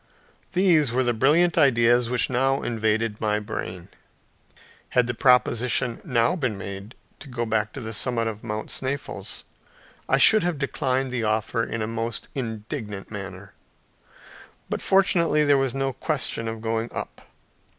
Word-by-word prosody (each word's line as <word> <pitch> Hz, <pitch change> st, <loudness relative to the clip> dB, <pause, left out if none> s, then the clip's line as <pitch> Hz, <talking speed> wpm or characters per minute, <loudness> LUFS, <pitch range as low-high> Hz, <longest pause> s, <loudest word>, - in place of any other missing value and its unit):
These 170 Hz, -8 st, +4 dB
were 130 Hz, +2 st, +1 dB
the 120 Hz, -1 st, +1 dB
brilliant 155 Hz, +9 st, +3 dB
ideas 120 Hz, -2 st, +4 dB
which 125 Hz, -1 st, +1 dB
now 135 Hz, +2 st, +1 dB
invaded 110 Hz, -1 st, -1 dB
my 105 Hz, -1 st, +1 dB
brain. 95 Hz, -5 st, -6 dB, 1.1 s
Had 125 Hz, -, +5 dB
the 120 Hz, -, -2 dB
proposition 125 Hz, 0 st, +2 dB
now 120 Hz, +6 st, +2 dB
been 130 Hz, -, -2 dB
made 100 Hz, +3 st, -8 dB, 0.2 s
to -, -, -11 dB
go 120 Hz, -1 st, -2 dB
back 110 Hz, -1 st, 0 dB
to 135 Hz, -, -6 dB
the 110 Hz, -1 st, -5 dB
summit 115 Hz, +1 st, 0 dB
of 110 Hz, -1 st, -5 dB
Mount 110 Hz, -1 st, -4 dB
Sneffels, 130 Hz, -7 st, -3 dB, 0.7 s
I 135 Hz, -, +4 dB
should 215 Hz, +10 st, +7 dB
have 175 Hz, -2 st, -1 dB
declined 135 Hz, -1 st, -1 dB
the 120 Hz, -2 st, -2 dB
offer 110 Hz, +2 st, 0 dB
in 115 Hz, -1 st, -3 dB
a -, -, -2 dB
most 115 Hz, 0 st, -4 dB
indignant 110 Hz, -4 st, -5 dB
manner. 100 Hz, -1 st, -8 dB, 1.2 s
But -, -, -2 dB
fortunately 170 Hz, -5 st, +3 dB
there 145 Hz, -1 st, +4 dB
was 135 Hz, -1 st, 0 dB
no 135 Hz, -1 st, -1 dB
question 130 Hz, -5 st, -2 dB
of 110 Hz, 0 st, -5 dB
going 115 Hz, +1 st, -2 dB
up. -, -, -6 dB
120 Hz, 150 wpm, -24 LUFS, 110-135 Hz, 1.2 s, should